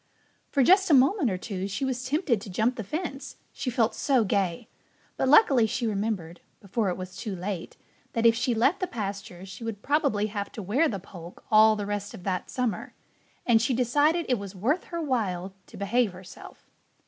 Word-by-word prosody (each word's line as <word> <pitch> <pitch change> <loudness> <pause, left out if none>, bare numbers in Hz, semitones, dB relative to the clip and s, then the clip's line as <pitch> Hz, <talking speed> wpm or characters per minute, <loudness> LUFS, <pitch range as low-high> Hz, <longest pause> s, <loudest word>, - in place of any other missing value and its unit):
For 275 - +2
just 380 +7 +5
a 300 - +7
moment 275 - +4
or 185 - -2
two 190 0 -4
she 200 +7 -3
was 250 -1 -2
tempted 270 - 0
to 205 - -9
jump 225 +7 +1
the 225 - -5
fence, 285 - -5 0.2
she 260 - -3
felt 230 -2 +1
so 260 -2 +2
gay. 190 -4 -1 0.5
But 265 - 0
luckily 270 - +6
she 235 +2 -2
remembered, 200 -6 -2 0.2
before 200 +1 -1
it 180 - -3
was 185 0 -8
too 210 -5 -5
late, 185 -1 -5 0.4
that 230 0 0
if 230 - +7
she 240 +1 0
left 270 - +2
the 370 - -1
pasture 200 - -6
she 195 +4 -10
would 220 -3 -5
probably 280 -8 +1
have 205 -1 -4
to 215 - -6
wear 255 - +2
the 200 - -3
poke 175 -2 -12
all 215 0 +7
the 205 -1 -4
rest 205 0 -4
of 180 - -12
that 185 -2 -2
summer. 250 -4 -3 0.5
And 225 -2 +4
she 245 +2 +1
decided 290 +7 +2
it 250 -4 +1
was 200 -1 -8
worth 255 - 0
her 340 - -5
while 200 - -2
to - - -13
behave 210 +1 +1
herself. 185 0 -13
225 Hz, 200 wpm, -27 LUFS, 195-260 Hz, 0.5 s, a